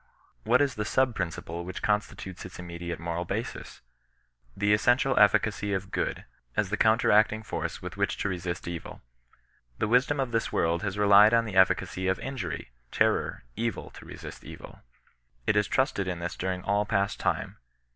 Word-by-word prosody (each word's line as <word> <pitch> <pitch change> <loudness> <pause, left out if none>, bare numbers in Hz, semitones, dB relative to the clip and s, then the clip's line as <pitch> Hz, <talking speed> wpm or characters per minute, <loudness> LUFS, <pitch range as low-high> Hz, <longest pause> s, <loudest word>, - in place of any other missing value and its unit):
What 120 +4 +4
is 140 -2 +2
the 105 - -3
sub 130 +3 +2
principle 85 -3 -4
which 90 +1 -7
constitutes 105 -3 -2
its 90 - -9
immediate 85 -1 -6
moral 85 +1 -3
basis? 100 +6 -5 0.8
The 100 +1 +3
essen 120 +3 +4
tial 135 0 0
efficacy 105 0 +3
of 95 0 -3
good, - - -2 0.3
as 105 -2 +1
the - - +2
counteracting 110 -1 +3
force - - -4
with - - -7
which - - 0
to - - -1
resist 90 -2 -4
evil. 85 -6 -7 0.7
The - - 0
wisdom 130 +5 +3
of 130 -3 -1
this 115 -1 0
world 85 +1 +1
has 105 -1 -3
re 105 - +2
lied 105 +3 +7
on 115 0 +3
the 105 -4 -6
efficacy 95 0 +2
of 95 - +2
injury, 95 - -5 0.2
terror, - - +1
evil, 115 +1 -3
to - - -13
resist - - -9
evil. - - -11 0.7
It - - +3
has 105 -1 +2
trusted 130 -8 0
in 90 -1 -2
this 85 0 -4
during 95 0 -3
all 100 +1 +1
past 100 -1 0
time. - - -1
100 Hz, 175 wpm, -28 LUFS, 90-110 Hz, 0.8 s, lied